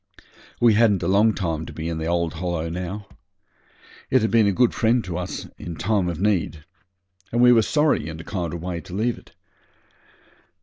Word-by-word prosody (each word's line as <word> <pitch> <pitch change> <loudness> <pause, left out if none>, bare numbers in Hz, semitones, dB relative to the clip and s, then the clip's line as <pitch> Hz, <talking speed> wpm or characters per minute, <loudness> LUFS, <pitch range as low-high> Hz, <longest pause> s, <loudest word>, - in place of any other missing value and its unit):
We 120 -2 +5
hadn't 105 -4 +3
a - - 0
long 105 +3 +4
time 80 -4 -3
to 80 - -9
be 80 +2 -5
in 85 -1 -3
the 80 - -3
old 85 -1 0
Hollow 85 -1 -3
now. 90 +4 -5 1.0
It 130 -3 +3
had 110 - 0
been 115 -3 +4
a - - +3
good 120 +5 +2
friend 115 +1 +2
to 90 -2 -5
us 90 +1 -5
in 85 - -6
time 95 +1 0
of 85 -2 -4
need, 90 -6 0 0.7
and 120 - 0
we 125 0 +7
was 115 -3 +3
sorry 150 - +2
in 80 0 -7
a - - -8
kind 90 -5 -4
of 85 -1 -6
way 90 -2 -4
to 90 - -9
leave 115 +4 -1
it. - - -22
90 Hz, 205 wpm, -23 LUFS, 85-110 Hz, 1.0 s, we